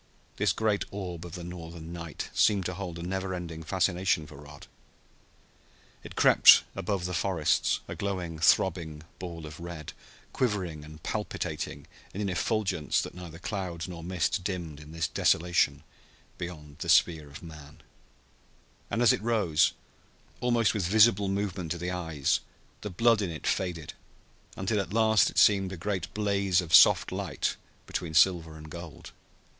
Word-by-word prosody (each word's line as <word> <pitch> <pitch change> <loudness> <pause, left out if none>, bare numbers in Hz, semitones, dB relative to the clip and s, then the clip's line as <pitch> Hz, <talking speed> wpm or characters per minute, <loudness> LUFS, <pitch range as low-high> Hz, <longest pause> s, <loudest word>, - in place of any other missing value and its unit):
This - - +2
great 110 -2 0
orb 90 -4 -6
of 85 - -12
the 90 - -6
Northern 85 -1 -8
night 85 -2 -6
seemed 100 -4 +3
to 90 - -2
hold 90 -2 -6
a 85 - -6
never 95 +1 -3
ending 85 -2 -6
fascination 90 -1 +1
for 75 -1 -12
Rod. 75 +1 -12 1.4
It - - -10
crept - - +7
above 95 -1 -2
the 90 - -3
forests, 85 - +1
a - - -5
glowing, 90 -5 -4
throbbing 80 -2 +2 0.2
ball 85 -3 -7
of 75 +1 -10
red, 85 -3 -7 0.4
quivering 95 - -1
and 75 +1 -13
palpitating - - -4 0.3
in 105 - -3
an 100 - -1
effulgence 95 -2 0
that - - -7
neither 85 -2 -9
cloud 90 -3 -4
nor 85 -2 -8
mist 90 +3 -1
dimmed 85 -6 -4
in 75 0 -12
this 80 0 -1
desolation 85 +1 +2 0.6
beyond 75 -4 -8
the - - -4
sphere 80 -4 +3
of 70 - -11
man; 75 -2 -12 1.1
and 120 - 0
as 115 - +6
it - - -2
rose, 105 -9 +2 0.7
almost 120 -3 +2
with 100 -6 -1
visible 105 0 +5
movement 95 -3 -2
to - - -6
the 90 +1 -3
eyes, 80 -6 0 0.4
the 105 - -4
blood 115 +3 +3
in 95 - -1
it 80 -2 -7
faded, 85 -5 -2 0.6
until 105 +3 0
at 95 - -7
last 110 -1 +4
it - - -11
seemed 95 -2 +5
a 95 - -6
great 95 0 -3
blaze 100 -3 +1
of 85 -3 -4
soft - - +7
light - - -2 0.3
between 80 -2 -4
silver 85 -3 +3
and 75 0 -11
gold. 85 -2 -9
90 Hz, 160 wpm, -28 LUFS, 80-100 Hz, 1.4 s, crept